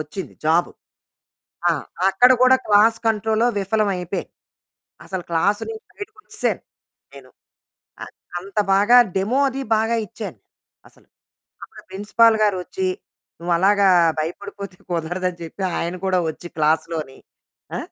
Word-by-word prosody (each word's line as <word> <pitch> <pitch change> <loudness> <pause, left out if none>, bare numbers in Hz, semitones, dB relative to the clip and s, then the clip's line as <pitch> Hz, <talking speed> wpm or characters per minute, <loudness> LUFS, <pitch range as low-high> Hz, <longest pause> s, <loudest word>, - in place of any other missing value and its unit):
వచ్చింది 155 +2 -7
జాబు. 165 +3 +2 1.0
ఆ! - - +3 0.4
అక్కడ 245 +7 +5
గూడా 255 +1 +6
క్లాస్ 215 +2 +5
కంట్రోల్‌లో 220 +1 +1
విఫలం 205 +2 0
అయిపేయాను. 180 +2 -5 0.7
అసలు 190 -2 -5
క్లాసునుంచి 205 - -1
బయటికొచ్చేసాను 430 +1 -4 0.5
నేను. - - -14 0.7
అది. - - -14 0.3
అంత 195 +3 -7 0.2
బాగా 205 +5 +5 0.2
డెమో 205 +8 +1
అది 270 +1 -5 0.2
బాగా 225 +2 +1
ఇచ్చాను 185 - -8 0.5
అసలు. - - -26 0.6
అప్పుడా - - -12
ప్రిన్సిపల్ 215 +3 +3
గారొచ్చి, 210 - -1 0.5
"నువ్వు 175 +1 -2
అలాగా 200 +1 +4 0.3
భయపడిపోతే 200 +4 -6
కుదరదు" 175 +2 -2
అని 175 - -15
చెప్పి 170 +4 -6 0.2
ఆయన 170 +2 -3
కూడా 185 -1 +2
వచ్చి 160 +2 -7
క్లాస్‌ 155 +1 +2
లోని, 150 -5 -6 0.6
ఆ! - - -2
200 Hz, 120 wpm, -21 LUFS, 175-220 Hz, 1.0 s, గూడా